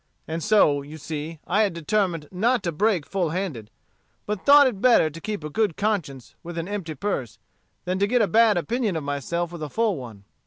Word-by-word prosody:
And 160 Hz, +1 st, -3 dB
so, 160 Hz, -8 st, +4 dB
you 145 Hz, +3 st, -10 dB
see, 155 Hz, +1 st, -6 dB
I 210 Hz, +2 st, +2 dB
determined 170 Hz, -2 st, -1 dB
not 230 Hz, +7 st, +1 dB
to 170 Hz, -, -1 dB
break 185 Hz, -1 st, +1 dB
full 185 Hz, -4 st, -1 dB
handed, 155 Hz, -, -4 dB, 0.6 s
but 210 Hz, -2 st, -4 dB
thought 285 Hz, 0 st, +8 dB
it 225 Hz, -7 st, -1 dB
better 235 Hz, -11 st, +5 dB
to 165 Hz, +3 st, -10 dB
keep 210 Hz, -4 st, -4 dB
a 150 Hz, -, -4 dB
good 210 Hz, -2 st, 0 dB
conscience 175 Hz, -, -2 dB
with 170 Hz, 0 st, -8 dB
an 165 Hz, +1 st, -3 dB
empty 190 Hz, -6 st, -4 dB
purse, 140 Hz, -, -3 dB, 0.5 s
than 185 Hz, +1 st, -1 dB
to 200 Hz, -, +2 dB
get 245 Hz, +3 st, +2 dB
a -, -, +2 dB
bad 220 Hz, -2 st, +4 dB
opinion 220 Hz, +1 st, -1 dB
of 160 Hz, -, -3 dB
myself 155 Hz, +5 st, -3 dB
with 170 Hz, -2 st, -8 dB
a 150 Hz, -, -4 dB
full 220 Hz, 0 st, 0 dB
one. 115 Hz, -6 st, -10 dB
175 Hz, 205 wpm, -24 LUFS, 155-210 Hz, 0.6 s, thought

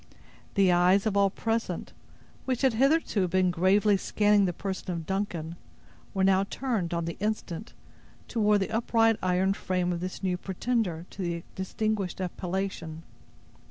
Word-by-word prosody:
The 195 Hz, -2 st, +5 dB
eyes 180 Hz, +3 st, +4 dB
of 215 Hz, -2 st, 0 dB
all 200 Hz, -1 st, +4 dB
present, 225 Hz, +3 st, -2 dB, 0.5 s
which 255 Hz, 0 st, -1 dB
had 265 Hz, -3 st, +4 dB
hitherto 265 Hz, -, +2 dB
been 185 Hz, +1 st, +2 dB
gravely 195 Hz, +4 st, +3 dB
scanning 205 Hz, +1 st, +3 dB
the 180 Hz, -, +1 dB
person 190 Hz, +2 st, -5 dB
of 165 Hz, -2 st, -4 dB
Duncan, 175 Hz, -4 st, -3 dB, 0.6 s
were 190 Hz, -, +2 dB
now 190 Hz, 0 st, +4 dB
turned, 220 Hz, -7 st, -2 dB
on 170 Hz, -1 st, -1 dB
the 170 Hz, -, -5 dB
instant, 210 Hz, -2 st, -3 dB, 0.5 s
toward 210 Hz, -3 st, +2 dB
the 195 Hz, -, -2 dB
upright 225 Hz, 0 st, +3 dB
iron 185 Hz, +1 st, +2 dB
frame 180 Hz, -2 st, -1 dB
of 170 Hz, -, -3 dB
this 185 Hz, +2 st, -5 dB
new 180 Hz, -1 st, 0 dB
pretender 190 Hz, -3 st, -2 dB
to 195 Hz, -, -7 dB
the 170 Hz, -2 st, -2 dB
distinguished 195 Hz, 0 st, -2 dB
appellation. 180 Hz, -3 st, -4 dB
190 Hz, 150 wpm, -28 LUFS, 180-210 Hz, 0.6 s, The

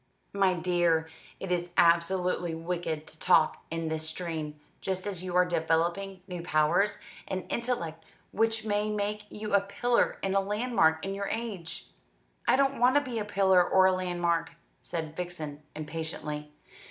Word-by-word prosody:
"My 195 Hz, -2 st, +3 dB
dear, 170 Hz, -2 st, +2 dB, 0.3 s
it 190 Hz, -, -5 dB
is 175 Hz, 0 st, 0 dB
absolutely 175 Hz, 0 st, +3 dB
wicked 165 Hz, -2 st, -3 dB
to 155 Hz, -, -14 dB
talk 165 Hz, -4 st, +3 dB
in 165 Hz, 0 st, -3 dB
this 160 Hz, 0 st, 0 dB
strain; 160 Hz, -3 st, -3 dB, 0.3 s
just 185 Hz, -1 st, -2 dB
as 195 Hz, -4 st, -2 dB
you 180 Hz, -1 st, -4 dB
are 180 Hz, 0 st, +6 dB
developing 175 Hz, +3 st, 0 dB
new 180 Hz, -2 st, -5 dB
powers, 170 Hz, +5 st, +2 dB, 0.3 s
an 185 Hz, -, -2 dB
intellect 170 Hz, -10 st, -2 dB, 0.3 s
which 225 Hz, 0 st, +1 dB
may 210 Hz, 0 st, 0 dB
make 210 Hz, 0 st, -2 dB
you 210 Hz, -1 st, -5 dB
a 200 Hz, -, +6 dB
pillar 235 Hz, +4 st, +1 dB
and 195 Hz, 0 st, 0 dB
a 195 Hz, -, +4 dB
landmark 200 Hz, -6 st, +1 dB
in 195 Hz, -, -2 dB
your 200 Hz, 0 st, -3 dB
age." 195 Hz, -8 st, -2 dB, 0.6 s
"I -, -, +6 dB
don't 275 Hz, -1 st, +2 dB
want 250 Hz, +2 st, +5 dB
to 290 Hz, -, +6 dB
be 250 Hz, -5 st, -4 dB
a 210 Hz, -, -2 dB
pillar 190 Hz, -3 st, +4 dB
or 190 Hz, +1 st, +4 dB
a 190 Hz, -, +6 dB
landmark," 175 Hz, -3 st, 0 dB, 0.3 s
said 160 Hz, -2 st, -5 dB
Vixen 160 Hz, -5 st, -5 dB
impatiently. 150 Hz, -1 st, -5 dB
180 Hz, 160 wpm, -29 LUFS, 165-200 Hz, 0.6 s, are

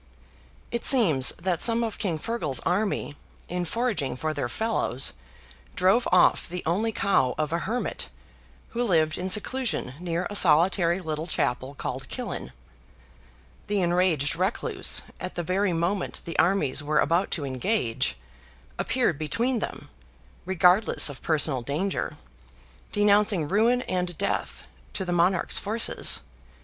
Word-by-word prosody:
It 235 Hz, -, -3 dB
seems 170 Hz, -, +5 dB
that 175 Hz, -1 st, -1 dB
some 235 Hz, 0 st, +3 dB
of 225 Hz, -2 st, -4 dB
King 180 Hz, -6 st, -1 dB
FEARGAL's 155 Hz, -, -2 dB
army, 195 Hz, -6 st, -1 dB, 0.3 s
in 180 Hz, 0 st, -3 dB
foraging 195 Hz, -, -2 dB
for 155 Hz, +3 st, -2 dB
their 140 Hz, -5 st, -3 dB
fellows, 220 Hz, -, 0 dB, 0.6 s
drove 195 Hz, +7 st, +2 dB
off 180 Hz, -, +3 dB
the 180 Hz, +1 st, -5 dB
only 200 Hz, +8 st, 0 dB
cow 195 Hz, -12 st, +1 dB
of 155 Hz, +1 st, -2 dB
a 170 Hz, -, 0 dB
hermit, 230 Hz, +7 st, -3 dB, 0.6 s
who 240 Hz, +1 st, -2 dB
lived 160 Hz, -7 st, +1 dB
in 185 Hz, +1 st, -3 dB
seclusion 210 Hz, -, +2 dB
near 175 Hz, 0 st, -3 dB
a 205 Hz, -, -7 dB
solitary 175 Hz, +1 st, +4 dB
little 160 Hz, -2 st, -4 dB
chapel 130 Hz, -2 st, -2 dB
called 130 Hz, -1 st, -6 dB
Killin. 250 Hz, -1 st, -6 dB, 1.2 s
The 205 Hz, -2 st, 0 dB
enraged 175 Hz, -5 st, +1 dB
recluse, 185 Hz, +6 st, +1 dB, 0.2 s
at 185 Hz, -, -6 dB
the 175 Hz, -, -3 dB
very 185 Hz, +3 st, 0 dB
moment 175 Hz, +3 st, -2 dB
the 165 Hz, -, -5 dB
armies 170 Hz, -7 st, +2 dB
were 150 Hz, +1 st, -1 dB
about 170 Hz, +5 st, +1 dB
to 145 Hz, -, -5 dB
engage, 130 Hz, -, -1 dB, 0.6 s
appeared 230 Hz, -, 0 dB
between 235 Hz, -, -1 dB
them, -, -, -7 dB, 0.5 s
regardless 185 Hz, 0 st, +4 dB
of 140 Hz, -, -10 dB
personal 150 Hz, -4 st, +2 dB
danger, 155 Hz, +10 st, -3 dB, 0.7 s
denouncing 205 Hz, -5 st, +3 dB
ruin 230 Hz, +7 st, +2 dB
and 180 Hz, -2 st, -3 dB
death 200 Hz, -, -3 dB, 0.3 s
to 190 Hz, -, -4 dB
the 175 Hz, -, -2 dB
monarch's 175 Hz, +1 st, +2 dB
forces. 220 Hz, +3 st, 0 dB
180 Hz, 135 wpm, -25 LUFS, 155-205 Hz, 1.2 s, seems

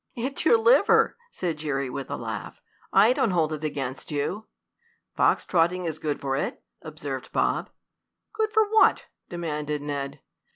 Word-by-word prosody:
"It's 270 Hz, +5 st, -3 dB
your 460 Hz, -, +6 dB
liver," 470 Hz, +2 st, +4 dB
said 175 Hz, -, -3 dB
Jerry 140 Hz, -3 st, -2 dB
with 130 Hz, +1 st, -6 dB
a -, -, -2 dB
laugh. -, -, -6 dB, 0.3 s
"I 210 Hz, +5 st, +6 dB
don't 245 Hz, -, +1 dB
hold 165 Hz, -4 st, +1 dB
it 155 Hz, 0 st, -6 dB
against 135 Hz, -3 st, -4 dB
you." 155 Hz, +9 st, -3 dB, 0.7 s
"Fox -, -, +3 dB
trotting 175 Hz, +1 st, +1 dB
is 160 Hz, -2 st, -3 dB
good 150 Hz, -2 st, -2 dB
for 135 Hz, -1 st, -1 dB
it," 135 Hz, -, -3 dB, 0.2 s
observed 145 Hz, -4 st, -6 dB
Bob. -, -, 0 dB, 0.6 s
"Good 435 Hz, 0 st, 0 dB
for 440 Hz, -1 st, +3 dB
what?" 440 Hz, +1 st, +4 dB, 0.2 s
demanded 150 Hz, -4 st, -3 dB
Ned. 140 Hz, -1 st, -4 dB
155 Hz, 155 wpm, -26 LUFS, 145-215 Hz, 0.7 s, your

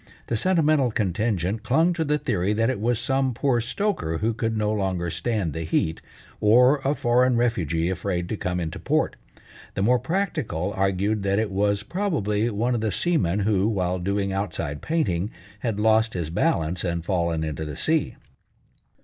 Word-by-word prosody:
The 115 Hz, -, -2 dB
sentimental 155 Hz, -3 st, +3 dB
contingent 105 Hz, -1 st, -1 dB
clung 160 Hz, +10 st, +2 dB
to 165 Hz, -1 st, -1 dB
the 150 Hz, -1 st, +1 dB
theory 100 Hz, -7 st, 0 dB
that 115 Hz, +3 st, +2 dB
it 130 Hz, -, -4 dB
was 120 Hz, +2 st, +1 dB
some 135 Hz, +1 st, 0 dB
poor 125 Hz, -2 st, +1 dB
stoker 120 Hz, -, -1 dB
who 110 Hz, +6 st, 0 dB
could 115 Hz, 0 st, -2 dB
no 105 Hz, 0 st, +1 dB
longer 95 Hz, -5 st, -1 dB
stand 90 Hz, -1 st, -1 dB
the 80 Hz, -, -4 dB
heat, 80 Hz, 0 st, -1 dB, 0.4 s
or 125 Hz, +6 st, +5 dB
a 140 Hz, +2 st, +1 dB
foreign 125 Hz, 0 st, +3 dB
refugee 85 Hz, -9 st, 0 dB
afraid 90 Hz, -1 st, -2 dB
to -, -, -1 dB
come 90 Hz, -3 st, -2 dB
into 80 Hz, -2 st, -4 dB
port. -, -, 0 dB, 0.6 s
The 95 Hz, -, 0 dB
more 125 Hz, +4 st, +4 dB
practical 115 Hz, -, -2 dB
argued 95 Hz, +2 st, 0 dB
that 100 Hz, 0 st, +1 dB
it 110 Hz, -1 st, 0 dB
was 100 Hz, +1 st, +1 dB
probably 120 Hz, -, -1 dB
one 115 Hz, +3 st, 0 dB
of 120 Hz, -, -1 dB
the 110 Hz, -1 st, 0 dB
seamen 105 Hz, -, +1 dB
who, 100 Hz, -1 st, +2 dB
while 90 Hz, -4 st, -1 dB
doing 100 Hz, +1 st, -1 dB
outside 85 Hz, -7 st, -3 dB
painting, 105 Hz, -, 0 dB, 0.3 s
had 110 Hz, -4 st, -2 dB
lost 110 Hz, +1 st, +3 dB
his 85 Hz, -3 st, -3 dB
balance 85 Hz, +1 st, 0 dB
and 85 Hz, -2 st, -2 dB
fallen 85 Hz, -4 st, 0 dB
into 80 Hz, 0 st, -3 dB
the 75 Hz, -2 st, -5 dB
sea. 160 Hz, -, 0 dB
105 Hz, 175 wpm, -24 LUFS, 90-120 Hz, 0.6 s, or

